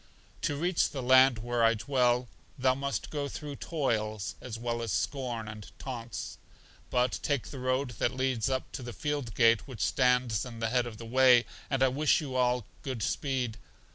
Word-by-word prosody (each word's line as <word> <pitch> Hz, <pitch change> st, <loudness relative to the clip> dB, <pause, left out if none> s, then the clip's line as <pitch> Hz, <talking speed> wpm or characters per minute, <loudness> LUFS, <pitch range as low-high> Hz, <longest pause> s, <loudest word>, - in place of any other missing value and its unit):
To 145 Hz, -, 0 dB
reach 175 Hz, +4 st, +1 dB
the 135 Hz, -3 st, -5 dB
land 130 Hz, 0 st, +6 dB
where 120 Hz, +1 st, -1 dB
I 115 Hz, 0 st, +5 dB
dwell, 125 Hz, 0 st, +1 dB, 0.3 s
thou 130 Hz, -1 st, +3 dB
must 140 Hz, +1 st, -3 dB
go 145 Hz, -2 st, -2 dB
through 145 Hz, 0 st, -6 dB
toils, 110 Hz, -, -1 dB
as 120 Hz, -3 st, -6 dB
well 120 Hz, 0 st, -2 dB
as 115 Hz, -3 st, -3 dB
scorn 120 Hz, -1 st, -2 dB
and 105 Hz, -1 st, -8 dB
taunts. 120 Hz, -4 st, -6 dB, 0.5 s
But 125 Hz, 0 st, +1 dB
take 145 Hz, -5 st, -1 dB
the 135 Hz, -, -7 dB
road 130 Hz, +1 st, 0 dB
that 125 Hz, -, +1 dB
leads 130 Hz, -3 st, 0 dB
up 130 Hz, -1 st, -2 dB
to -, -, -6 dB
the 120 Hz, -1 st, -6 dB
field 145 Hz, -7 st, -3 dB
gate 115 Hz, +1 st, +4 dB
which 125 Hz, -7 st, -7 dB
stands 125 Hz, -2 st, +2 dB
in 120 Hz, -2 st, -8 dB
the 115 Hz, -1 st, 0 dB
head 125 Hz, 0 st, +1 dB
of 110 Hz, -2 st, -8 dB
the 115 Hz, -, -8 dB
way; 125 Hz, 0 st, +5 dB, 0.2 s
and 135 Hz, -2 st, +2 dB
I 130 Hz, -, +5 dB
wish 145 Hz, +4 st, +3 dB
you 135 Hz, -4 st, -5 dB
all 125 Hz, -2 st, +2 dB, 0.2 s
good 130 Hz, -6 st, -4 dB
speed. 130 Hz, -6 st, -1 dB
125 Hz, 190 wpm, -30 LUFS, 115-135 Hz, 0.5 s, land